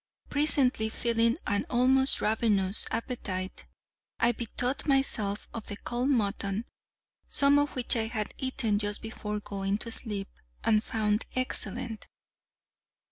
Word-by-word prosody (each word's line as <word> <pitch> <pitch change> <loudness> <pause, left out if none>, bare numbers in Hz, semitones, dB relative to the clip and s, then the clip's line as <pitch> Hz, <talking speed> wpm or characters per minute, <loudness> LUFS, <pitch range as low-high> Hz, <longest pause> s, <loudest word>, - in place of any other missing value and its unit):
Presently 275 -6 +2
feeling 230 +2 +1
an 205 0 0
almost 265 +2 +5
ravenous 210 -3 +3
appetite, 195 -5 -4 0.5
I 235 - +4
bethought 245 +4 -3
myself 220 -7 0
of 225 - -7
the 205 - -4
cold 245 +5 -2
mutton, 205 -3 0 0.6
some 280 +1 +4
of 290 0 -1
which 250 -1 +2
I 220 -1 0
had 220 -2 -4
eaten 250 -5 0
just 205 +1 0
before 210 -1 -4
going 195 -1 -3
to 230 +2 -6
sleep, 205 -4 -2 0.3
and 215 -1 +3
found 215 -1 -1
excellent. 225 -3 -3
225 Hz, 125 wpm, -29 LUFS, 205-250 Hz, 0.6 s, almost